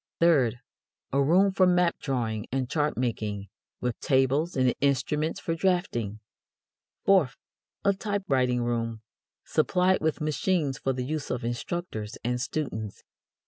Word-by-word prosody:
Third, 140 -9 +4 0.6
a 140 - +3
room 180 +8 +4
for 190 -1 +4
map 180 -1 +3
drawing 115 -6 -2
and 130 0 -1
chart 150 +2 0
making, 105 -5 -2 0.3
with 125 -2 -2
tables 135 +5 +2
and 130 -1 +3
instruments 140 +3 +1
for 165 - -2
draughting. 165 - 0 0.9
Fourth, 175 -9 +4 0.5
a 200 - +5
typewriting 140 - 0
room, 115 -2 -2 0.4
supplied 185 +1 +2
with 160 -1 0
machines 150 -1 0
for 135 - 0
the 125 -1 -3
use 150 +1 -3
of 125 -2 -2
instructors 120 -3 -4
and 125 +1 -1
students. 115 -7 -4
135 Hz, 130 wpm, -27 LUFS, 120-170 Hz, 0.9 s, a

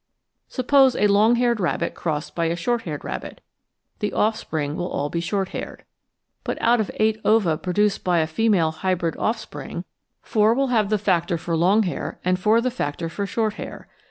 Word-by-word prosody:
Suppose 265 0 +3
a - - +2
long 210 +3 +5
haired 240 -1 +1
rabbit 170 -2 -1
crossed 150 -2 -3
by 170 - -1
a 165 +1 0
short 235 +8 -1
haired 150 -3 -5
rabbit, - - -6 0.6
the 210 -2 -1
offspring 160 -9 -1
will 145 -5 -2
be 170 - -1
all - - -2
short 190 +2 -1
haired. - - -7 0.6
But - - -3
out 240 +1 +3
of 210 - -3
eight 220 0 +1
ova 210 -8 +3
produced 195 +5 0
by 180 -1 +2
a 160 - +3
female 170 -1 +2
hybrid 170 0 -1
offspring, 215 - -3 0.4
four 220 +1 +3
will 270 0 +1
have 220 -5 +2
the 215 - +2
factor 175 -4 +1
for 165 +1 -2
long 190 +7 +4
hau* 180 - -4
and 180 0 +2
four 215 +5 +3
the 255 +1 0
factor 165 - -3
for 200 +4 -3
short 215 0 -1
hau*. - - -7
195 Hz, 185 wpm, -23 LUFS, 170-220 Hz, 0.6 s, long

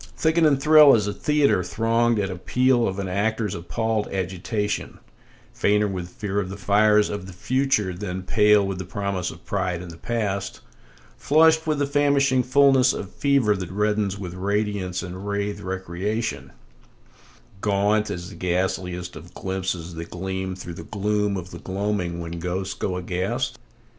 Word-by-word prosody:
Thicken 160 0 +3
and 140 -3 +3
thrill 150 -1 +8
as 105 -3 +1
a 105 - -2
theatre 150 +6 +2
thronged 115 0 +1
at 95 -2 -1
appeal 120 +6 +2
of 95 - -3
an 100 -1 -3
actor's 105 +2 -1
appalled 110 +5 -2
agitation, 95 +3 -3 0.6
Fainter 105 +1 +2
with 90 -3 -4
fear 100 +1 -3
of 95 -2 -3
the 100 - -6
fires 105 +2 +4
of 100 -2 -5
the 95 - -9
future 125 -2 0
than 90 0 -5
pale 105 +1 +4
with 95 -1 -3
the - - -3
promise 95 -1 -3
of 80 - -12
pride 95 -3 -1
in 90 0 -8
the 85 - -10
past; 100 -1 -3 0.6
Flushed 160 +2 +4
with 155 -1 +1
the 145 - +1
famishing 140 -2 +3
fullness 130 0 +4
of 100 - -6
fever 135 -7 +2
that 90 -3 -5
reddens 105 0 0
with 90 -3 -6
radiance 100 -1 -1
and 90 0 -6
rathe* 100 0 -2
recreation, 95 +4 -3 0.4
[speedy] - - -28 0.2
Gaunt 105 +1 +2
as 90 0 -5
the - - -10
ghastliest 90 0 -2
of 85 +2 -12
glimpses 95 -3 -3
that 85 0 -7
gleam 95 +1 -4
through 90 -2 -8
the 90 - -8
gloom 105 -1 -1
of 90 0 -7
the - - -8
gloaming 95 -3 -2
when 85 0 -5
ghosts 90 +2 -3
go 90 -2 -3
aghast? 90 +1 -2
100 Hz, 165 wpm, -24 LUFS, 90-110 Hz, 0.6 s, thrill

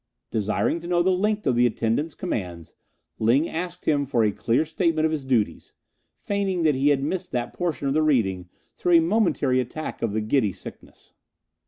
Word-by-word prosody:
Desiring 110 +9 0
to 170 - -9
know 175 0 +2
the 190 - +3
length 210 +3 0
of 130 - +2
the 120 +1 +4
attendant's 120 +7 -1
commands, 90 - -5 0.5
Ling 125 +9 +3
asked 175 +2 -5
him 145 -2 +1
for 120 -4 +2
a 105 - +2
clear 120 +8 0
statement 160 0 0
of 160 - +1
his 155 -3 -2
duties, 125 -6 -1 0.4
feigning 195 -4 -1
that 155 -2 +4
he 135 +2 +2
had 140 -2 +2
missed 180 +5 -3
that 120 -1 -2
portion 165 -5 -2
of 135 - +1
the 155 - +2
reading 95 - +1 0.3
through 175 - 0
a 170 - +8
momentary 165 - +2
attack 130 +5 -5
of 115 -3 -1
the 110 - 0
giddy 110 -2 +1
sickness. - - -13
145 Hz, 190 wpm, -24 LUFS, 115-170 Hz, 0.5 s, a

